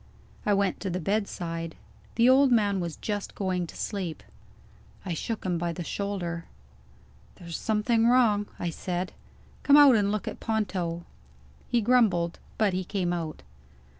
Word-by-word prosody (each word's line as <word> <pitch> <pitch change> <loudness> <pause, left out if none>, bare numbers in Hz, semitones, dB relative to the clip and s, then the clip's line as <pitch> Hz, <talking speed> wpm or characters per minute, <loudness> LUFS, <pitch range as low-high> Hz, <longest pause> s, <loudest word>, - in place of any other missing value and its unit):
I 205 - +4
went 195 -2 0
to 195 - -3
the 180 +1 -2
bedside. 165 -4 -2 0.4
The 235 +1 +4
old 265 +1 +6
man 205 -4 +3
was 170 -3 -3
just 205 -2 -4
going 185 -3 -1
to - - -11
sleep. 185 -6 -4 0.8
I 180 - -2
shook 215 +7 -4
him 175 -2 0
by 170 0 -1
the 175 - -5
shoulder. 175 -3 -3 0.9
"There's 170 -2 -8
something 225 +1 +2
wrong," 225 -5 +4
I 175 - -2
said. 180 +2 -3 0.5
"Come 285 0 +6
out 285 -4 +8
and 205 -2 +2
look 215 -1 -2
at - - -5
Ponto." 180 -6 -2 0.6
He 240 - +2
grumbled 205 -8 +2 0.2
but 210 -3 +2
he 185 +1 -1
came 180 -2 -1
out. 165 - -4
195 Hz, 155 wpm, -27 LUFS, 175-220 Hz, 0.9 s, out